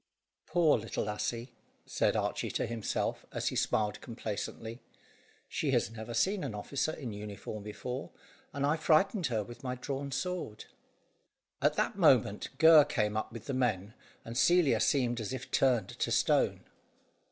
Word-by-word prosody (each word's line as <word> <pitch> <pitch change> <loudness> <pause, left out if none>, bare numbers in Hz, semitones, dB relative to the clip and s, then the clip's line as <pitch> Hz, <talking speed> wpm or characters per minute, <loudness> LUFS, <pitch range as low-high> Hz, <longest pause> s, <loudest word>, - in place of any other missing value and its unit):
"Poor 160 -5 +3
little 110 - -3
lassie!" 105 +4 -3 0.3
said - - +1
Archy - - -1
to - - -1
himself, 115 -3 -2
as - - -1
he - - -6
smiled 105 -1 0
complacently; 115 0 -5 0.7
"she - - -2
has 105 - +1
never 115 +1 -7
seen 190 - +1
an 105 - -4
officer 135 +8 -2
in 125 -8 -6
uniform 105 +1 -7
before, 125 +6 -5 0.4
and 140 -1 -1
I 150 +3 +2
frightened 170 +4 +3
her 110 -4 -1
with 120 +3 -12
my 125 -1 -2
drawn 140 +2 -4
sword." 180 - -3 1.0
At - - +3
that - - -1
moment, - - +4
Gurr 160 -2 +8
came 105 -8 0
up 110 - -2
with 115 -1 -9
the 140 - -3
men, 110 -6 0 0.3
and 115 - -7
Celia 175 +3 +4
seemed 120 -4 +1
as 110 +3 -4
if 130 0 -6
turned 125 -7 +2
to - - -2
stone. - - +2
120 Hz, 155 wpm, -31 LUFS, 110-145 Hz, 1.0 s, Gurr